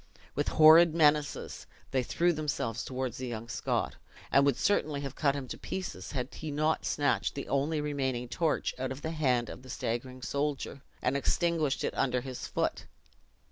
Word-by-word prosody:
With 145 - -1
horrid 160 +1 +7
menaces, 150 -2 +2 0.2
they 130 - +2
threw 170 +7 +1
themselves 140 -7 -2
toward 130 -2 -3
the 130 +1 -5
young 115 -1 -5
Scot, 105 - -1 0.3
and 140 - +6
would 135 -3 +2
certainly 150 -4 +1
have 140 -2 -5
cut 140 -2 +1
him 135 -2 -4
to - - -6
pieces, 190 -4 -5
had 130 0 -3
he 155 - -6
not 155 +2 0
snatched 145 -1 +1
the 140 - -5
only 145 +3 +1
remaining 135 -4 -1
torch 160 +5 0
out 130 0 -2
of 135 +2 -7
the 160 - -2
hand 130 -7 +1
of - - -8
the 130 - -14
staggering 125 +2 -3
soldier, 140 -1 -2 0.2
and 125 +2 +1
extinguished 155 0 +1
it - - -1
under 125 -2 +1
his 130 -1 -6
foot. - - -1
140 Hz, 180 wpm, -30 LUFS, 130-155 Hz, 0.3 s, horrid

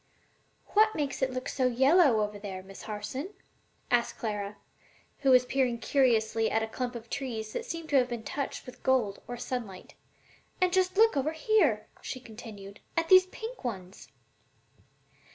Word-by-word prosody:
"What 435 +1 +4
makes 285 -3 -2
it 265 - +2
look 255 0 -4
so 255 -1 +1
yellow 265 0 +4
over 210 0 -3
there, 190 -2 -6
Miss 195 +1 -11
Harson?" 240 - -5 0.6
asked 240 -1 +2
Clara, 210 -2 -4 0.6
who 275 - +2
was 250 -1 +6
peering 250 -2 +1
curiously 225 -3 +2
at 220 - +1
a - - -2
clump 245 +2 -4
of 230 -1 -8
trees 230 -5 -4
that 465 - -3
seemed 330 -8 -6
to 285 - +4
have 250 -1 +3
been 235 -2 -4
touched 280 +3 -4
with 250 - -12
gold 245 -7 +1
or 245 - -5
sunlight. 230 -7 -5 0.7
"And 365 -1 +2
just 370 0 +2
look 450 -3 +6
over 285 +3 0
here," 315 - +2 0.2
she 255 - -5
continued, 215 -4 -11 0.2
"at 330 0 +1
these 370 0 +8
pink 450 +3 -8
ones!" 190 -6 -6
250 Hz, 165 wpm, -29 LUFS, 220-295 Hz, 0.7 s, these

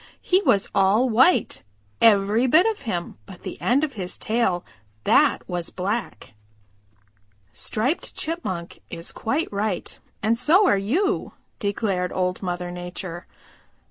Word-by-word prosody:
"He 370 +2 +3
was 200 - +3
all 200 +6 +3
white, 260 +11 +3 0.4
every 215 +2 +4
bit 315 +8 +5
of 445 -2 -1
him 175 -3 -4
but 190 -3 -12
the - - -7
end 265 +5 +2
of 295 -3 -1
his 185 -5 -5
tail, 215 -6 0 0.4
that - - +3
was 175 -2 -2
black." 190 - -4 1.2
"Striped 250 +10 -2
Chipmunk 190 - -4
is 170 0 -5
quite 275 +2 -2
right 200 -2 -3 0.2
and 230 +2 +2
so 340 +11 +5
are 360 - +4
you," 305 - 0 0.3
declared 200 -3 -1
Old 180 0 -1
Mother 180 -1 -3
Nature. 175 0 -7
205 Hz, 130 wpm, -23 LUFS, 180-255 Hz, 1.2 s, bit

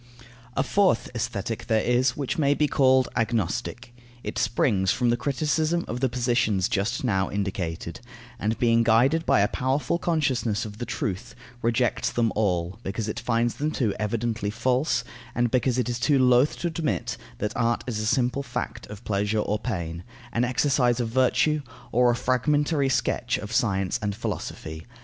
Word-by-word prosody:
A 135 - +3
fourth 195 +6 +2
Aesthetic 110 -1 -3
there 110 -2 +2
is, 125 +2 +2
which 145 +5 -2
may 145 -1 +3
be 150 - +2
called 130 -2 +4
agnostic. 120 +1 -2 0.3
It - - -3
springs 105 -3 +1
from 120 -1 +1
the - - +3
criticism 155 +6 0
of 120 - -4
the 130 0 +1
positions 120 -6 +1
just 105 0 -1
now 95 -6 +1
indicated, 95 -4 -3 0.4
and 110 +3 -1
being 115 -1 +3
guided 125 +8 +3
by - - +4
a 100 - +4
powerful 135 +8 -1
consciousness 130 -12 0
of 105 0 -9
the 120 - -4
truth, 105 +4 -4 0.3
rejects 120 +1 +1
them 115 -2 +1
all, 95 -2 0
because 105 +1 -3
it 110 - -3
finds 120 0 +1
them 150 +2 0
too 120 -9 0
evidently 110 0 -1
false, 125 +4 +1 0.3
and 120 -1 +1
because 125 -1 +1
it 125 - 0
is 120 0 -2
too 145 +3 +3
loth 125 +2 +4
to 175 - -2
admit 160 -2 -2 0.2
that 105 - -3
art 115 0 +1
is 115 -4 -3
a 110 - -1
simple 125 +3 +1
fact 140 - -5
of 105 +2 -10
pleasure 105 +1 0
or 105 0 0
pain, 85 -7 -4 0.3
an 120 - +1
exercise 125 -1 +2
of 120 -2 -1
virtue, 130 +5 +2 0.3
or 125 +1 +4
a 120 - +3
fragmentary 145 +3 +1
sketch 135 - 0
of 105 +1 -7
science 95 -1 +1
and 100 -1 -2
philosophy. 80 -4 -5
120 Hz, 170 wpm, -25 LUFS, 105-130 Hz, 0.4 s, called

